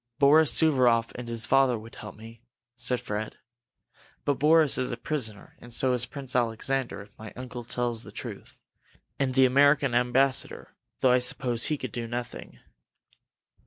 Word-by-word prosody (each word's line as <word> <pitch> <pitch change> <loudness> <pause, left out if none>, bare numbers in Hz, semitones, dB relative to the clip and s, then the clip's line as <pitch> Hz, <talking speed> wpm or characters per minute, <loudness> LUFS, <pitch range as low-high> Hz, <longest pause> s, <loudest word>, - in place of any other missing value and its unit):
"Boris 150 0 +5
Suvaroff 125 -6 +3
and 120 -1 -8
his 115 0 0
father 135 -1 +3
would 110 +1 -12
help 105 - -9
me," 115 +1 -13 0.3
said 125 +1 -2
Fred. 105 +1 -5 0.9
"But 145 -2 0
Boris 155 -1 +4
is 130 - 0
a 120 - -4
prisoner, 115 -7 -5
and 120 - -14
so 130 +2 +1
is 125 0 0
Prince 135 -4 -6
Alexander, 120 +1 -1
if 100 0 -22
my 110 -1 -9
uncle 125 -1 -8
tells 120 -1 -2
the - - -12
truth! - - -9 0.6
And 130 -2 -1
the 135 -1 +6
American 140 0 +3
ambassador 125 +2 +1 0.3
though 130 - +4
I 125 - +4
suppose 125 -1 +1
he 155 - 0
could 130 -4 -6
do 120 -2 -5
nothing." 120 0 -7
125 Hz, 160 wpm, -27 LUFS, 115-135 Hz, 0.9 s, the